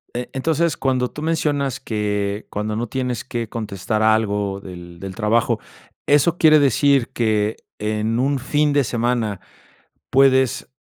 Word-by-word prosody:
Eh, 125 Hz, 0 st, -4 dB
entonces, 160 Hz, +2 st, 0 dB
cuando 130 Hz, -2 st, 0 dB
tú 150 Hz, -, -9 dB
mencionas, 145 Hz, -5 st, 0 dB
que 105 Hz, -4 st, -2 dB
cuando 105 Hz, +1 st, -3 dB
no 120 Hz, +2 st, -2 dB
tienes 125 Hz, -1 st, -3 dB
que 120 Hz, -4 st, -4 dB
contestar 110 Hz, -1 st, -2 dB
algo 105 Hz, -3 st, +1 dB
del 85 Hz, -2 st, -10 dB
del 95 Hz, -1 st, -7 dB
trabajo, 115 Hz, +1 st, +1 dB, 0.5 s
eso 150 Hz, +4 st, +3 dB
quiere 155 Hz, -1 st, +6 dB
decir, 140 Hz, -1 st, +3 dB
que 110 Hz, -2 st, 0 dB, 0.2 s
en 110 Hz, +2 st, -1 dB
un 140 Hz, +2 st, +1 dB
fin 145 Hz, +3 st, +1 dB
de 145 Hz, -1 st, +3 dB
semana 115 Hz, -4 st, -1 dB, 0.7 s
puedes, 130 Hz, -1 st, +3 dB
120 Hz, 140 wpm, -21 LUFS, 105-135 Hz, 0.7 s, quiere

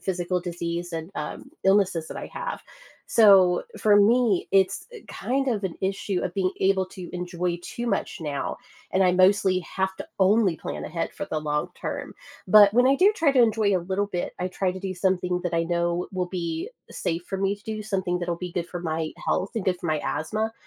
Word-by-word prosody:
physical 180 Hz, -1 st, -1 dB
disease 170 Hz, 0 st, -4 dB
and, 165 Hz, +2 st, -5 dB
um, 150 Hz, -, -6 dB
illnesses 190 Hz, -4 st, +3 dB
that -, -, -7 dB
I -, -, -5 dB
have. -, -, -5 dB, 0.5 s
So, 195 Hz, -5 st, +6 dB, 0.2 s
for 210 Hz, -1 st, +4 dB
me, 220 Hz, -1 st, +3 dB
it's 190 Hz, -1 st, +2 dB, 0.2 s
kind 270 Hz, +2 st, -2 dB
of 220 Hz, -5 st, 0 dB
an 185 Hz, -3 st, -3 dB
issue 190 Hz, 0 st, -1 dB
of 180 Hz, -, -4 dB
being 185 Hz, -2 st, +1 dB
able 190 Hz, 0 st, +2 dB
to 185 Hz, -1 st, -9 dB
enjoy 175 Hz, 0 st, -2 dB
too 235 Hz, +6 st, -5 dB
much 220 Hz, -, -2 dB
now, 140 Hz, -3 st, -3 dB, 0.3 s
and 190 Hz, -, +1 dB
I 180 Hz, -, +4 dB
mostly 185 Hz, 0 st, +4 dB
have 190 Hz, +2 st, -2 dB
to -, -, -7 dB
only 195 Hz, -2 st, +4 dB
plan -, -, -6 dB
ahead 165 Hz, +1 st, -3 dB
for 195 Hz, -, -5 dB
the 155 Hz, -5 st, -3 dB
long 150 Hz, -1 st, -1 dB
term. -, -, -5 dB, 0.3 s
But 205 Hz, 0 st, +8 dB
when 245 Hz, +1 st, +5 dB
I 275 Hz, -, +4 dB
do 390 Hz, +6 st, +5 dB
try 325 Hz, -7 st, +3 dB
to 270 Hz, -2 st, +4 dB
enjoy 220 Hz, -4 st, +3 dB
a -, -, +2 dB
little 195 Hz, +2 st, 0 dB
bit, 180 Hz, -3 st, -3 dB
I 180 Hz, -, -1 dB
try 185 Hz, 0 st, -1 dB
to 190 Hz, -, -8 dB
do 190 Hz, -1 st, -3 dB
something 180 Hz, -1 st, 0 dB
that 175 Hz, -1 st, -1 dB
I 165 Hz, -, +2 dB
know 170 Hz, +1 st, -1 dB
will 185 Hz, -1 st, -1 dB
be 170 Hz, -3 st, -3 dB, 0.2 s
safe 170 Hz, 0 st, -3 dB
for 195 Hz, -, -2 dB
me 195 Hz, +1 st, +1 dB
to 205 Hz, -, -19 dB
do, 220 Hz, -1 st, -5 dB
something 190 Hz, -4 st, -1 dB
that'll 175 Hz, -1 st, -2 dB
be 180 Hz, +1 st, -6 dB
good 175 Hz, -2 st, -2 dB
for 175 Hz, -, -5 dB
my 160 Hz, -2 st, -2 dB
health 195 Hz, -, 0 dB
and 225 Hz, -4 st, -2 dB
good 180 Hz, -1 st, +1 dB
for 175 Hz, -, -5 dB
my 155 Hz, -2 st, 0 dB
asthma. 215 Hz, +10 st, -2 dB
185 Hz, 210 wpm, -25 LUFS, 175-200 Hz, 0.5 s, But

